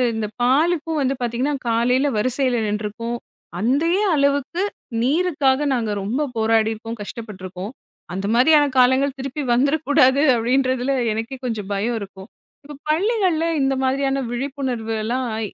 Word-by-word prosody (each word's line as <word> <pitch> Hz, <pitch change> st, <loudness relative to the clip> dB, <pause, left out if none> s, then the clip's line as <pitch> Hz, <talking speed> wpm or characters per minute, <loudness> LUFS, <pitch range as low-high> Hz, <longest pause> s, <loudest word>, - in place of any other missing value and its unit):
இந்த 220 Hz, -1 st, -2 dB
பாலுக்கும் 315 Hz, +5 st, +2 dB
வந்து 270 Hz, 0 st, +1 dB
பார்த்தீங்கன்னா, 245 Hz, +4 st, -1 dB, 0.2 s
காலையில 250 Hz, +4 st, +2 dB
வரிசையில 255 Hz, +2 st, +1 dB
நின்றுருக்கோம். 215 Hz, +3 st, -3 dB, 0.4 s
அதே 315 Hz, -, +2 dB
அளவுக்கு 280 Hz, +4 st, +1 dB, 0.4 s
நீருக்காக 295 Hz, -1 st, +2 dB
நாங்க 230 Hz, -4 st, -1 dB
ரொம்ப 235 Hz, +9 st, -1 dB, 0.2 s
போராடியிருக்கோம், 225 Hz, 0 st, 0 dB
கஷ்டப்பட்டுருக்கோம். 195 Hz, -3 st, -7 dB, 0.4 s
அந்த 195 Hz, +2 st, -3 dB
மாதிரியான 295 Hz, +4 st, +5 dB
காலங்கள் 260 Hz, +2 st, +4 dB
திருப்பி 275 Hz, +2 st, -4 dB
வந்துறக்கூடாது, 280 Hz, 0 st, +3 dB
அப்பிடின்றதில 255 Hz, +2 st, +1 dB, 0.2 s
எனக்கே 225 Hz, +5 st, -4 dB
கொஞ்சம் 215 Hz, -5 st, -3 dB
பயம் 225 Hz, +4 st, -1 dB
இருக்கும். 195 Hz, -1 st, -10 dB, 0.4 s
இப்ப 295 Hz, +1 st, -10 dB
பள்ளிகள்ல 365 Hz, -1 st, +1 dB, 0.2 s
இந்த 270 Hz, 0 st, +2 dB
மாதிரியான 270 Hz, +1 st, +1 dB
விழிப்புணர்வு 250 Hz, -3 st, -3 dB
எல்லாம் 250 Hz, +4 st, -1 dB
அ -, -, -3 dB
255 Hz, 120 wpm, -21 LUFS, 225-285 Hz, 0.4 s, மாதிரியான